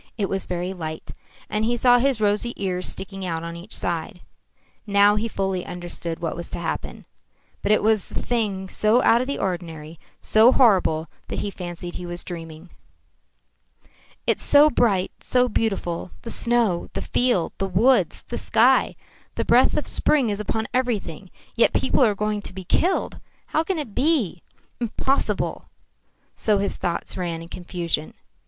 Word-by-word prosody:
It 200 -3 -1
was 195 -1 -2
very 180 +1 -3
light. 160 -3 -6 0.3
And 210 0 -1
he 240 +2 +1
saw 245 0 +5
his 265 -2 +1
rosy 210 +3 +1
ears 185 -2 -2
sticking 195 0 -5
out 165 -2 -3
on 170 0 -6
each 175 +6 -4
side. 175 +2 -3 0.7
Now 200 0 +5
he 215 +2 -1
fully 190 -4 -2
understood 175 -1 -6
what 165 -2 -3
was 170 - -7
to - - -4
happen. - - -5 0.6
But 205 - 0
it 215 - +3
was 215 -2 +2
a - - -10
thing 205 -5 -1
so 215 +5 +2
out 230 +1 +5
of 255 - -3
the 280 - -2
ordinary, 165 -4 -4 0.2
so 220 +3 +5
horrible, 185 - +3 0.2
that - - -3
he 205 - -3
fancied 175 -1 -7
he 180 - -6
was 175 0 -5
dreaming. 165 -1 -9 1.5
"It's - - +1
so 295 +1 +6
bright, 195 -9 +2
so 250 0 +2
beautiful 195 -7 -2
the 230 - -6
snow, 235 -7 +1
the - - -3
field, 245 -9 +1
the 195 - 0
woods, 230 +9 +2
the - - -5
sky. - - +3 0.4
The - - -1
breath - - +4
of - - -1
spring 265 -8 +3
is 205 - -3
upon 220 +1 -2
everything. 210 -8 -2 0.3
Yet 235 - +4
people 265 - +2
are 215 -4 +3
going 210 +1 -1
to 190 - -6
be 190 0 -7
killed. 355 - 0 0.3
How 315 - 0
can 365 +2 -2
it 285 -9 -5
be? 255 - +1 0.4
Impossible!" 245 +3 -1 0.7
So 210 -2 +2
his 200 0 -2
thoughts 170 -1 -3
ran 170 -2 -3
in 165 - -12
confusion. 170 -3 -3
200 Hz, 165 wpm, -23 LUFS, 175-230 Hz, 1.5 s, so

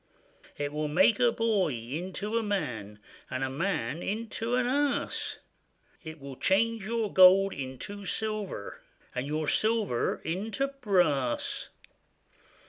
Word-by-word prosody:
It 145 0 -3
will 150 0 -1
make 205 +8 +4
a 240 -1 +5
boy 215 - +1
into 175 - -4
a 230 - +3
man, 135 - -3 0.3
And 130 +1 -2
a 130 - -1
man 160 -2 -1
into 225 +3 -2
an 250 -1 +2
ass; 285 +3 0 0.7
It 160 -1 -8
will 135 -2 -9
change 220 +1 +1
your 225 -2 -1
gold 190 +1 +7
into 140 +10 -6
silver, 215 - -3 0.3
And 130 +2 -3
your 155 +1 -2
silver 215 - +1
into 215 +11 -1
brass. 180 - +1
190 Hz, 125 wpm, -29 LUFS, 145-220 Hz, 0.7 s, gold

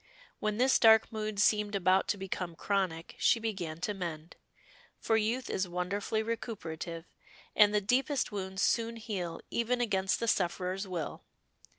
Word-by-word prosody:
When 215 0 -1
this 260 +2 +4
dark 220 -1 +6
mood 215 -1 -3
seemed 210 0 +3
about 190 0 +3
to 205 - 0
become 185 -3 -4
chronic 185 -4 -1
she 230 - +4
began 185 -8 -4
to 210 - -1
mend, 170 -4 -6 0.6
for 225 - +1
youth 225 +4 0
is 190 -1 -1
wonderfully 190 +5 -2
recuperative, 170 -8 -5 0.5
and 210 -1 +7
the 210 0 +2
deepest 260 +6 +1
wounds 190 -1 -3
soon 230 0 +1
heal 190 -7 -4
even 240 +1 0
against 195 -5 +1
the 230 - -2
sufferer's 185 0 0
will. 170 -5 -4
200 Hz, 150 wpm, -31 LUFS, 180-220 Hz, 0.6 s, and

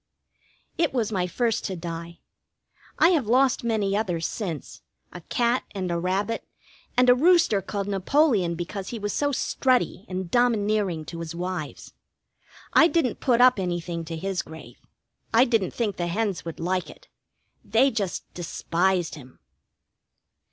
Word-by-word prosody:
It 330 -5 +2
was 225 -4 0
my 185 -3 0
first 230 +4 0
to 190 - -3
die. 170 0 -7 0.8
I 325 - +6
have 310 - +2
lost 255 +2 +3
many 215 -4 0
others 175 -6 -1
since: 170 - -5 0.3
a 180 - -8
cat, 240 +7 0
and 185 -2 -2
a 170 - 0
rabbit, 195 +6 -1 0.5
and 250 0 +5
a 250 - +8
rooster 320 - +4
called 200 +1 -4
Napoleon 200 - +2
because 185 +3 -5
he 235 - -4
was 205 -1 -3
so 285 0 +1
strutty 255 -6 0
and 185 -2 -4
domineering 210 -8 +1
to 170 - -7
his 165 0 -6
wives. 175 -3 -5 0.8
I 330 - +7
didn't 330 -8 0
put 245 -2 +2
up 250 -4 +6
anything 175 -2 -3
to 165 0 -5
his 190 +1 -2
grave. 160 0 -12 0.6
I 240 +3 +7
didn't 225 -7 +1
think 215 -5 -2
the 175 - -1
hens 200 +1 -1
would 165 - -6
like 180 +2 -1
it. - - -15 0.6
They 230 +7 +3
just 200 -6 -2
despised 175 +1 -1
him. 130 -4 -12
195 Hz, 150 wpm, -25 LUFS, 175-240 Hz, 0.8 s, a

